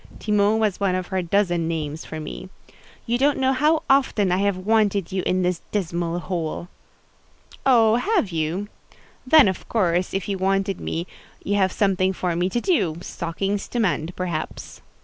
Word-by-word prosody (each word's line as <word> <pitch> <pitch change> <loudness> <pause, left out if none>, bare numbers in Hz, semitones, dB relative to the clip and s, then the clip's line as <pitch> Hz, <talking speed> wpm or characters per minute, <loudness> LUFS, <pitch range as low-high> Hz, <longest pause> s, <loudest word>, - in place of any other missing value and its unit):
Timon 210 0 +2
was 215 -4 0
one 195 -2 +1
of 185 -1 -3
her 190 -2 0
dozen 175 -2 +1
names 155 -1 -4
for 160 - -6
me. 155 +4 -7 0.6
"You 240 +1 0
don't 285 +2 +3
know 265 0 +2
how 305 +4 +2
often 260 -8 +3
I 180 - +2
have 200 -1 +1
wanted 200 -2 +1
you 190 0 -1
in 185 0 +1
this 180 -1 0
dismal 175 -3 -2
hole." 170 0 -4 1.0
"Oh, 230 -3 +5
have 360 - 0
you? 165 +5 -2 0.6
Then, 305 -3 +7
of 190 - -3
course, 180 -5 +1
if 195 - -2
you 195 -2 -2
wanted 195 0 0
me, 170 +1 -3 0.4
you 205 - -1
have 190 -2 +2
something 190 -2 +1
for 180 -2 -2
me 175 +2 0
to 240 - -1
do: 190 - +1
stockings 195 +4 -3
to 240 - -3
mend, 175 -5 0
perhaps." 175 -4 -5
190 Hz, 170 wpm, -23 LUFS, 175-215 Hz, 1.0 s, Then